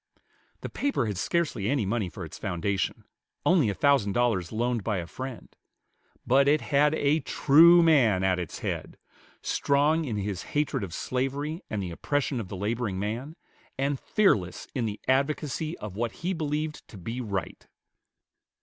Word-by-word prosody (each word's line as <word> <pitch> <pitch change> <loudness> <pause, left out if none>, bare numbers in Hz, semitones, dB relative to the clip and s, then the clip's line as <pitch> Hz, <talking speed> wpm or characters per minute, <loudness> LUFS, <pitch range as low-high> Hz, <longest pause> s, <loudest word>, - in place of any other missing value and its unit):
The - - -5
paper 280 - -1
had 105 -4 -3
scarcely 150 - 0
any 135 -7 +1
money 105 -2 -1
for 85 - -7
its 80 - -10
foundation, 95 +1 -2 0.4
only 170 - +4
a 100 - -2
thousand 140 -9 +3
dollars 110 -7 +1
loaned 120 0 -1
by 105 -2 -1
a 85 - -3
friend, 125 - -7 0.8
but 135 +2 +4
it 150 +2 +4
had 150 +1 +2
a 145 +1 +2
true 165 +5 +6
man 120 - +4
at 95 -1 +2
its 85 -4 -5
head, - - -4 0.5
strong 150 +3 +2
in 115 -6 -3
his 100 -2 -3 0.2
hatred 145 -5 0
of 95 - -5
slavery, 140 +6 -2
and 105 -2 -2
the 90 - -5
oppression 140 - -1
of 110 - -5
the 95 - -6
laboring 105 0 -2
man, 115 +10 -4 0.4
and 135 0 0
fearless 100 - +1
in 125 -4 -1
the 105 -1 -5
advocacy 150 +3 0
of 105 -3 -7
what 115 +1 -1
he 190 - +1
believed 155 -1 -3
to 105 - -12
be 115 +8 -5
right. 100 -6 -4
125 Hz, 165 wpm, -27 LUFS, 100-145 Hz, 0.8 s, true